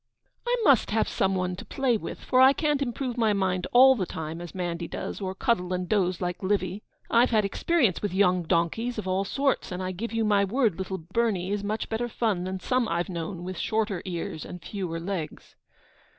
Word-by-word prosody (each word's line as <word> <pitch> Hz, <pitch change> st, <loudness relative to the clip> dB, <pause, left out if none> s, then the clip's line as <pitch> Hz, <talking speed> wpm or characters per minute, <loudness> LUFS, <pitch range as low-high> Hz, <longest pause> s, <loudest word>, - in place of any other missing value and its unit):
'I -, -, +3 dB
must 275 Hz, -, +5 dB
have 220 Hz, +1 st, +1 dB
some 195 Hz, 0 st, 0 dB
one 180 Hz, -1 st, -1 dB
to -, -, -7 dB
play 265 Hz, -3 st, 0 dB
with, 215 Hz, -, -5 dB
for 255 Hz, -1 st, +3 dB
I 265 Hz, +1 st, +8 dB
can't 295 Hz, -1 st, 0 dB
improve 250 Hz, -1 st, -2 dB
my 220 Hz, -2 st, +3 dB
mind 185 Hz, -2 st, 0 dB
all 260 Hz, +2 st, +8 dB
the 195 Hz, -8 st, -2 dB
time 160 Hz, +1 st, -5 dB
as 175 Hz, +1 st, -9 dB
'Mandy 175 Hz, -2 st, -3 dB
does, -, -, -5 dB
or 190 Hz, -1 st, -3 dB
cuddle 190 Hz, -5 st, 0 dB
and 180 Hz, 0 st, -2 dB
doze 185 Hz, -4 st, +1 dB
like 180 Hz, 0 st, -3 dB
Livy. 190 Hz, 0 st, -1 dB, 0.3 s
I've 235 Hz, +2 st, +5 dB
had 215 Hz, -3 st, +3 dB
experience 240 Hz, -, +1 dB
with 205 Hz, -, -1 dB
young 185 Hz, -1 st, +3 dB
donkeys 175 Hz, +9 st, 0 dB
of 210 Hz, -3 st, -4 dB
all 190 Hz, +1 st, 0 dB
sorts, 275 Hz, +2 st, 0 dB
and 180 Hz, +1 st, -3 dB
I 185 Hz, -, -2 dB
give 215 Hz, +6 st, -5 dB
you 225 Hz, -1 st, 0 dB
my 205 Hz, -1 st, +3 dB
word 215 Hz, -2 st, +1 dB
little 190 Hz, 0 st, -3 dB
Bernie 190 Hz, +1 st, -1 dB
is 205 Hz, 0 st, -1 dB
much 215 Hz, +2 st, -2 dB
better 235 Hz, +2 st, -2 dB
fun 210 Hz, -6 st, -1 dB
than 190 Hz, 0 st, -3 dB
some 250 Hz, +3 st, +1 dB
I've 175 Hz, +1 st, -1 dB
known 175 Hz, 0 st, -5 dB
with 185 Hz, -1 st, -5 dB
shorter 215 Hz, -4 st, -1 dB
ears 170 Hz, -2 st, -4 dB
and 180 Hz, -, -8 dB
fewer 180 Hz, -5 st, -4 dB
legs.' 170 Hz, -2 st, -5 dB
195 Hz, 210 wpm, -27 LUFS, 180-230 Hz, 0.3 s, I